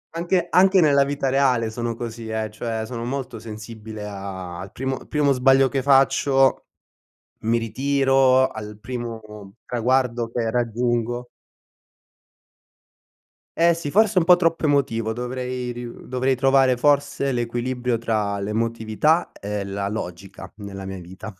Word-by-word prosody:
Anche 175 Hz, +1 st, +1 dB
anche 190 Hz, +1 st, +5 dB
nella 140 Hz, -4 st, +4 dB
vita 140 Hz, -1 st, -1 dB
reale 130 Hz, -5 st, +2 dB
sono 115 Hz, 0 st, -3 dB
così, 115 Hz, -1 st, -6 dB
eh, 110 Hz, -1 st, -3 dB
cioè 110 Hz, 0 st, -4 dB
sono 115 Hz, 0 st, -6 dB
molto 130 Hz, -2 st, -4 dB
sensibile 110 Hz, -1 st, -8 dB
a 95 Hz, -3 st, -7 dB
al 95 Hz, +2 st, -8 dB
primo 130 Hz, +1 st, -4 dB
primo 145 Hz, -2 st, +2 dB
sbaglio 135 Hz, +1 st, +4 dB
che 135 Hz, -1 st, -1 dB
faccio, 135 Hz, 0 st, +3 dB, 0.8 s
mi 115 Hz, +1 st, +2 dB
ritiro, 135 Hz, +2 st, +3 dB
al 105 Hz, -1 st, -8 dB
primo 110 Hz, -4 st, -7 dB
traguardo 120 Hz, -1 st, 0 dB
che 115 Hz, -2 st, -1 dB
raggiungo 120 Hz, +1 st, -1 dB, 2.3 s
Eh 170 Hz, 0 st, +4 dB
sì, 155 Hz, -4 st, -5 dB
forse 215 Hz, -1 st, +3 dB
un 175 Hz, -, +5 dB
po' 180 Hz, +1 st, +7 dB
troppo 165 Hz, -2 st, 0 dB
emotivo. 115 Hz, -6 st, +1 dB
Dovrei 125 Hz, +1 st, -4 dB
riu 120 Hz, 0 st, -9 dB
dovrei 130 Hz, +1 st, 0 dB
trovare 135 Hz, 0 st, +4 dB
forse 140 Hz, +1 st, +1 dB
l'equilibrio 120 Hz, 0 st, -2 dB
tra 105 Hz, -3 st, -1 dB
l'emotività 115 Hz, -, 0 dB
e 100 Hz, 0 st, -5 dB
la 100 Hz, 0 st, -3 dB
logica 95 Hz, -2 st, -7 dB
nella 100 Hz, -2 st, -8 dB
mia 95 Hz, -1 st, -6 dB
vita. 95 Hz, +5 st, -9 dB
120 Hz, 130 wpm, -23 LUFS, 110-135 Hz, 2.3 s, po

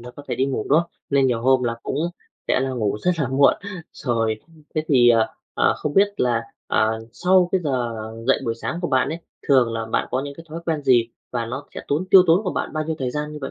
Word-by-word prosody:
nó 120 Hz, +1 st, -9 dB
có 145 Hz, -, -9 dB
thể -, -, -1 dB
đi 130 Hz, -, +1 dB
ngủ, 130 Hz, -5 st, -2 dB
đúng 150 Hz, +4 st, +5 dB
không? 170 Hz, -, -7 dB, 0.2 s
Nên 140 Hz, -1 st, +4 dB
nhiều 120 Hz, -3 st, 0 dB
hôm 130 Hz, 0 st, +4 dB
là 115 Hz, -1 st, -1 dB
cũng -, -, -3 dB, 0.5 s
sẽ -, -, +3 dB
là 135 Hz, 0 st, -1 dB
ngủ 110 Hz, -6 st, -1 dB
rất 180 Hz, -, +3 dB
là 140 Hz, -5 st, 0 dB
muộn. 140 Hz, +1 st, +4 dB, 0.4 s
Rồi 115 Hz, -4 st, -1 dB, 0.3 s
thế 155 Hz, -, +1 dB
thì, 125 Hz, -4 st, +5 dB
à, 115 Hz, -1 st, +3 dB, 0.3 s
à, -, -, +3 dB
không 150 Hz, -1 st, -4 dB
biết 200 Hz, +1 st, +5 dB
là, 120 Hz, -5 st, +1 dB, 0.2 s
ờ, 110 Hz, +1 st, +1 dB
sau 180 Hz, +2 st, +3 dB
cái 190 Hz, -, +2 dB
giờ 125 Hz, -5 st, 0 dB, 0.4 s
dậy 135 Hz, -, +3 dB
buổi 115 Hz, -2 st, -1 dB
sáng 135 Hz, +8 st, -4 dB
của 175 Hz, -, -2 dB
bạn 130 Hz, -1 st, +2 dB
ấy, 160 Hz, +3 st, -4 dB, 0.3 s
thường 130 Hz, -5 st, +4 dB
là 115 Hz, 0 st, -2 dB
bạn 110 Hz, -, -1 dB
có 130 Hz, -, 0 dB
những 140 Hz, 0 st, -7 dB
cái 165 Hz, -, -11 dB
thói 165 Hz, +2 st, -6 dB
quen 160 Hz, -3 st, -1 dB
gì 120 Hz, -4 st, +4 dB, 0.2 s
và 120 Hz, -2 st, -2 dB
nó 130 Hz, +4 st, -6 dB
sẽ -, -, -5 dB
tốn 150 Hz, +6 st, 0 dB
tiêu 190 Hz, -, +9 dB
tốn 175 Hz, +6 st, +4 dB
của 185 Hz, -, -1 dB
bạn -, -, -3 dB
bao 155 Hz, 0 st, -2 dB
nhiêu 160 Hz, 0 st, -3 dB
thời 130 Hz, -2 st, -2 dB
gian 150 Hz, +2 st, -4 dB
như 150 Hz, -, -7 dB
vậy? -, -, -5 dB
135 Hz, 260 wpm, -22 LUFS, 120-155 Hz, 0.5 s, tiêu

